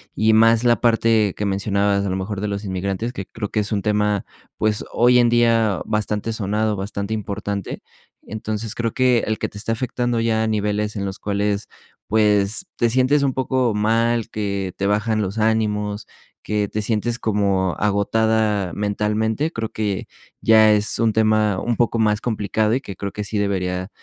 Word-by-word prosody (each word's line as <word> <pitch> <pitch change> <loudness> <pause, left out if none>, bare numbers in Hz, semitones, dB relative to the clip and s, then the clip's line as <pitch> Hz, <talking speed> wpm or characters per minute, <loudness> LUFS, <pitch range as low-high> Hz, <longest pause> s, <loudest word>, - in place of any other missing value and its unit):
y 110 +1 +3
más 115 +1 +5
la 120 -1 +3
parte 115 -3 +2
que 105 - -3
mencionabas, 100 0 0
a 100 - -1
lo 95 - -1
mejor, 95 +1 -4
de 105 - -2
los 100 0 -4
inmigrantes, 100 +4 -3
que 100 -6 -6
creo 105 0 -6
que 110 - -1
es 105 +2 -1
un 100 - 0
tema, 105 -1 0 0.3
pues, 110 -1 0
hoy 125 +1 +5
en 120 - +4
día 115 -4 +2
bastante 105 0 -1
sonado, 105 0 -1
bastante 100 +2 -4
importante. 100 -2 -4 0.4
Entonces, 110 +1 -4
creo 115 -1 -2
que 125 -2 +3
el 110 0 -1
que - - -2
te - - -11
está 115 +2 -1
afectando 120 0 -1
ya 110 -1 +1
a 110 - 0
niveles 105 0 -1
en 100 - -2
los 95 +1 -5
cuales, 100 0 -2 0.4
pues, 105 - +2
te 120 - +1
sientes 130 +4 +2
un 135 -2 +1
poco 130 -3 0
mal, 115 +2 +1
que 100 -3 -3
te 100 - -2
bajan 110 +2 +1
los 100 +2 -3
ánimos, 105 -1 0 0.4
que 105 -1 -1
te 110 - -2
sientes 115 +3 -1
como 100 -4 0
agotada 105 -1 +1
mentalmente, 105 +7 -1
creo 115 -6 -3
que 105 -3 -3 0.3
ya 110 -1 +6
es 105 0 +3
un 115 -1 +3
tema 110 -2 +2
un 120 - -1
poco 120 -1 +1
más 105 -1 +2
complicado 110 -1 0
y 130 - +1
que 100 -8 -8
creo 100 +1 -5
que 105 - -5
sí 105 +1 -3
debería 95 -2 -1
105 Hz, 180 wpm, -21 LUFS, 100-115 Hz, 0.4 s, ya